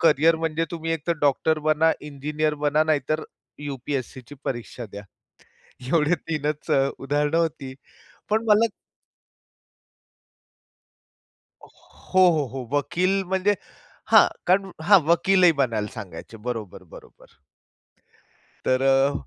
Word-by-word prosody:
Career 160 0 +4
म्हणजे 165 0 -1
तुम्ही 165 -1 -3
एक 160 -3 -5
तर 170 - +2
डॉक्टर 150 +2 +2
बना, 155 +1 +2
इंजिनियर 150 +1 -2
बना 150 +1 +3
नाहीतर 155 0 0 0.4
यू-पी-एस-सीची 135 -1 -5
परीक्षा 120 -1 -5
द्या. 100 - -8 0.9
एवढे 165 +1 +3
3च 150 -3 -4
अ, 135 0 +3
उदाहरणं 145 +3 0
होती, 155 -5 -2 0.6
पण 220 +2 +1
मला 215 +1 +5 3.0
हो, - - -16 0.6
हो, 155 -4 +1
हो 130 -2 -5
वकील 185 +7 0
म्हणजे 190 +2 +1 0.6
हां, - - +8 0.2
कारण 190 +1 +2
हां, 200 +3 +7
वकीलही 175 +2 +4
बनायला 115 -6 0
सांगायचे. 110 0 -9
बरोबर, 110 -6 -5
बरोबर. - - -16 1.4
तर 130 0 +2
अ, 135 +1 +3
150 Hz, 110 wpm, -24 LUFS, 135-165 Hz, 3.0 s, हां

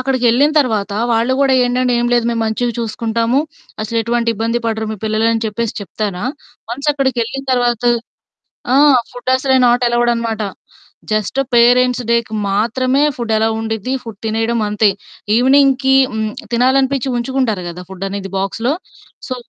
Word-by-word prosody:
అక్కడికెళ్ళిన 255 +1 +2
తర్వాత 215 -6 -1 0.2
వాళ్ళు 230 +3 +1
గూడా 270 -1 +3
ఏండంటే 250 0 +1
ఏం 240 - 0
లేదు 240 -1 +2
మేము 230 -1 -1
మంచిగా 235 +2 -1
చూసుకుంటాము. 230 +2 -1 0.4
అసలెటువంటి 230 +2 -1
ఇబ్బంది 230 +2 -1
పడరు 220 -1 -2
మీ - - -6
పిల్లలు 220 +1 +1
అని 225 0 -1
చెప్పేసి 225 +1 -3
చెప్తారా? 200 0 -4 0.5
వన్స్ 280 +5 -1
అక్కడికెళ్ళిన 265 -1 -2
తర్వాత 245 -2 +1 0.9
ఆ! - - +4 0.4
ఫుడ్డు 245 +1 -5
అసలే 265 0 +1
నాటెలవుడనమాట. 240 -2 +1 0.7
జస్టు 215 +5 0
పేరెంట్స్ 250 +1 +4
డేకి 235 -2 0
మాత్రమే 255 +6 +1 0.2
ఫుడ్డు 235 -2 -3
అలో 220 +1 +2
ఉండిద్ది 220 +2 -3
ఫుడ్ 225 -4 -9
తినేయడం 225 +2 0
అంతే. 210 0 +3 0.5
ఈవెనింగ్‌‌కి 265 +1 +4 0.2
హ్మ్. 220 -1 -2 0.2
తినాలనిపిచ్చి 265 +2 +2
ఉంచుకుంటారు 240 -6 -1
గదా! 175 +1 -8
ఫుడ్డనేది 195 +1 -5
బాక్స్‌లో. 225 +7 -1 0.6
సో 255 - -2
235 Hz, 130 wpm, -16 LUFS, 220-255 Hz, 0.9 s, ఆ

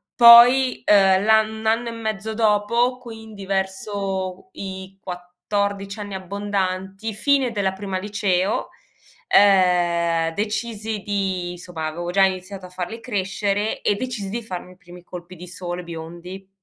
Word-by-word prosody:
poi, 245 +2 +8
ehm, 195 -1 +5
l'ann 220 0 +4
1 220 - -9
anno 230 +2 +1
e - - -5
mezzo 220 -1 -4
dopo, 230 +3 +2
quindi 220 -4 -10
verso 190 - -3
i 190 0 -8
14 195 +3 -4
anni 205 -2 -6
abbondanti, 195 +1 -3
fine 265 +2 +2
della 195 -3 -1
prima 190 -1 -4
liceo, 200 -1 -1 0.6
ehm, 175 -4 +3
decisi 215 0 -3
di 190 -3 -2
insomma 175 -3 -6
avevo 175 +2 -4
già 195 +1 +4
iniziato 190 0 -2
a - - -16
farli 180 +5 -6
crescere 205 -1 -2
e 205 - +1
decisi 225 -4 -4
di 235 +2 -4
farmi 185 -3 -7
i - - -24
primi 180 -3 -14
colpi 180 +1 -10
di 180 +1 -11
sole 175 0 -6
biondi, 170 +3 -9
195 Hz, 135 wpm, -22 LUFS, 180-215 Hz, 0.6 s, poi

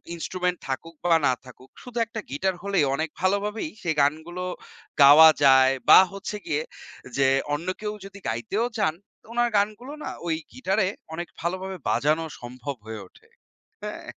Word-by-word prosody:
instrument 180 +1 -2
থাকুক 165 +5 -4
বা 170 -1 +5
না 130 - +3
থাকুক, 130 +1 -15
শুধু 245 -1 -9
একটা 225 0 -7
গিটার 185 +6 -1
হলেই 195 -7 +2
অনেক 160 +2 -2
ভালোভাবেই 205 - 0
সেই 160 -3 0
গানগুলো 160 +5 -1 0.6
গাওয়া 155 +3 +10
যায় 130 -1 +7 0.2
বা - - +11
হচ্ছে 200 +1 -5
গিয়ে 150 0 0 0.6
যে 135 -1 +4 0.3
অন্য 165 +5 -3
কেউ 210 0 -3
যদি 200 0 -11
গাইতেও 195 - -1
চান 155 -6 +2 0.3
তো - - -28
ওনার 240 0 +2
গানগুলো 215 +7 -1
না - - -4 0.2
ওই 160 - +1 0.2
গিটারে 195 -6 0 0.3
অনেক 175 +1 -4
ভালোভাবে 185 +2 -3
বাজানো 150 +8 +1 0.2
সম্ভব 125 +3 -6
হয়ে 110 -2 -7
ওঠে, - - -24 0.6
হ্যাঁ? - - -6
170 Hz, 155 wpm, -25 LUFS, 145-200 Hz, 0.6 s, বা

